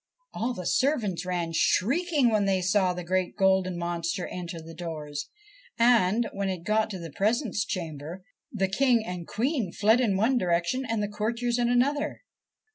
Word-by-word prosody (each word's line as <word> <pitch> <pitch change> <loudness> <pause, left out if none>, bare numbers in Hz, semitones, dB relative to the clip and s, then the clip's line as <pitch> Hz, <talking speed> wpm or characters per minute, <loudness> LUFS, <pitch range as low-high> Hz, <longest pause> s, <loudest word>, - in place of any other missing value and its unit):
All 240 +3 -2
the 180 - -6
servants 215 - 0
ran 175 -2 -1
shrieking 275 - +2
when 210 -2 +2
they 195 -1 +2
saw 185 0 +2
the 180 0 -5
great 185 +1 -1
golden 190 -2 +2
monster 170 +1 -2
entering 170 -2 -6
the 165 - -9
doors, 150 -4 -6 0.5
and, 230 -2 +4
when 200 -1 -2
it 180 -3 -4
got 215 +3 +1
to 195 - -5
the 165 -3 -8
presence 215 - 0
chamber, 165 0 -5 0.3
the 195 -3 0
King 230 +3 +2
and 180 -3 -6
Queen 240 - -1
fled 220 +6 +3
in 205 -6 +2
one 240 +5 +2
direction 175 +9 0
and 225 -2 0
the - - 0
courtiers 235 +4 -1
in 240 0 +2
another. 275 +4 +1
195 Hz, 170 wpm, -27 LUFS, 175-235 Hz, 0.5 s, and